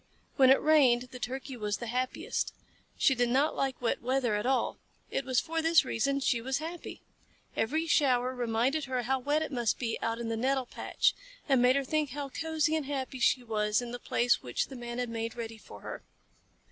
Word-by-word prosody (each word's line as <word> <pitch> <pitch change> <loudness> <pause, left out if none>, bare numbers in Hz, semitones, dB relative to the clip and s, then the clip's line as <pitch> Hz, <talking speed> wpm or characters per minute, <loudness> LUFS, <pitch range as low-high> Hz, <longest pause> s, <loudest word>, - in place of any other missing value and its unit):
When 260 -1 +6
it 265 - +7
rained 255 -5 +4
the 250 - -8
Turkey 265 +2 -5
was 210 -3 -2
the 240 - -6
happiest. 250 +2 -2 0.4
She 270 - +4
did 245 -1 +1
not 275 +5 +2
like 270 -2 -1
wet 240 - -1
weather 255 -2 +1
at 210 +3 -1
all. 265 0 0 0.3
It 270 - -1
was 255 -2 +2
for 330 0 -2
this 325 -2 +5
reason 275 +3 0
she 240 -3 +1
was 265 +3 -1
happy. 330 +3 -7 0.5
Every 310 +9 0
shower 260 -6 +2
reminded 245 +5 0
her 255 -2 -2
how 265 +3 0
wet 290 +4 +1
it 315 - -5
must 240 -4 0
be 230 -3 -3
out 230 0 -1
in 235 -1 -4
the 225 - -1
nettle 265 +2 +1
patch, - - 0 0.3
and 270 -4 +4
made 250 +1 +5
her 275 - +1
think 305 +1 0
how 280 +1 -5
cosy 320 +1 0
and 305 -4 -2
happy 265 -2 -3
she 250 +1 +3
was 210 -2 +1
in 240 -1 -5
the 245 - -5
place 240 0 +1
which 125 - -2
the 270 - -8
Man 240 -1 -6
had 245 -1 -2
made 230 0 -3
ready 225 -2 -6
for - - -13
her. - - -7
255 Hz, 210 wpm, -30 LUFS, 240-275 Hz, 0.5 s, it